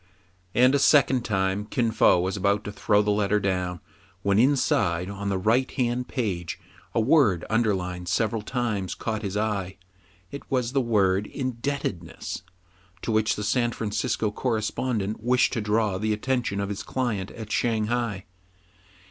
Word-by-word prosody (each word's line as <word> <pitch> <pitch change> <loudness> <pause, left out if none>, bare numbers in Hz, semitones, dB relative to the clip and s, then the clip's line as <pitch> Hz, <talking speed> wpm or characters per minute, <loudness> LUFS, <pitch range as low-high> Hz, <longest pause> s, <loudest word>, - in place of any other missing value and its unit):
'* 90 0 -36
And 125 +2 +5
a 140 - +3
second 135 -3 +4
time 95 -1 0
Kin 120 -3 0
Fo 100 - +4
was 95 +3 -1
about 100 +1 +1
to 105 - -5
throw 105 +1 +2
down - - -7
the 105 - +2
letter, 95 -4 0 0.4
when 100 +1 +3
inside, 100 -9 +2
on 100 0 -4
the 95 - 0
right 115 +7 +2
hand 125 0 -1
page, 95 - -3 0.4
a - - +3
word 110 - +3
underlined 95 -6 0
several 110 +3 0
times 110 -6 -2
caught 110 -1 -3
his 100 -1 -3
eye. 100 -3 -2 0.5
It 140 - -6
was 125 -3 0
the 135 0 +2
word 100 -4 +2
"indebtedness," 130 - -4 0.6
to - - -1
which 110 0 +2
the 105 - -4
San 120 +2 +1
Francisco 110 0 -1
correspondent 110 -2 -2
wished 125 +2 +2
to 115 - -1
draw 105 -2 +1
the 110 +1 0
attention 120 -2 -1
of 100 0 -2
his 100 0 -4
client 110 -5 -2
at 110 -2 -9
Shang 110 -2 +1
hai. 115 -4 -2
105 Hz, 160 wpm, -25 LUFS, 100-120 Hz, 0.6 s, And